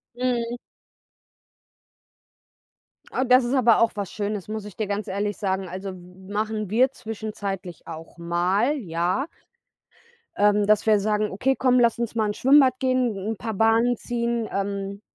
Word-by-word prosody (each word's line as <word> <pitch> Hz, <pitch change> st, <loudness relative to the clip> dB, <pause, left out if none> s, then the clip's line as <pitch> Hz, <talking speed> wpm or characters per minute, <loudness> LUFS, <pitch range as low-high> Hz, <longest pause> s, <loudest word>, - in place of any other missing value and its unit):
Mhm. 240 Hz, -1 st, -1 dB, 2.6 s
Ah, 260 Hz, -, 0 dB
das 250 Hz, 0 st, +5 dB
ist 240 Hz, -, -1 dB
aber 240 Hz, -4 st, +4 dB
auch 230 Hz, -, +4 dB
was 200 Hz, -3 st, -4 dB
Schönes, 205 Hz, -2 st, -3 dB
muss 215 Hz, -1 st, -5 dB
ich 210 Hz, -, -10 dB
dir 215 Hz, -, -2 dB
ganz 205 Hz, +1 st, -3 dB
ehrlich 205 Hz, +1 st, -2 dB
sagen. 190 Hz, -2 st, -2 dB
Also 190 Hz, +2 st, -6 dB
m 185 Hz, +1 st, -12 dB
machen 215 Hz, 0 st, -2 dB
wir 250 Hz, +6 st, +3 dB
zwischenzeitlich 205 Hz, -6 st, -6 dB
auch 165 Hz, +1 st, -9 dB
mal, 180 Hz, -, +1 dB
ja 180 Hz, -, -1 dB, 1.1 s
ähm, 205 Hz, 0 st, +4 dB
dass 210 Hz, 0 st, +3 dB
wir 215 Hz, -2 st, +4 dB
sagen: 210 Hz, +1 st, 0 dB
„Okay, 265 Hz, +7 st, +1 dB
komm, 255 Hz, -1 st, +3 dB
lass 235 Hz, -2 st, +3 dB
uns 235 Hz, -2 st, -2 dB
mal 220 Hz, -2 st, +1 dB
ins 205 Hz, -, -3 dB
Schwimmbad 265 Hz, -1 st, +5 dB
gehen, 255 Hz, -4 st, +1 dB
'n 225 Hz, -, -3 dB
paar 225 Hz, +1 st, -4 dB
Bahnen 225 Hz, +3 st, +3 dB
ziehen.“ 235 Hz, -1 st, -2 dB
Ähm, 200 Hz, 0 st, -3 dB
215 Hz, 155 wpm, -24 LUFS, 195-240 Hz, 2.6 s, das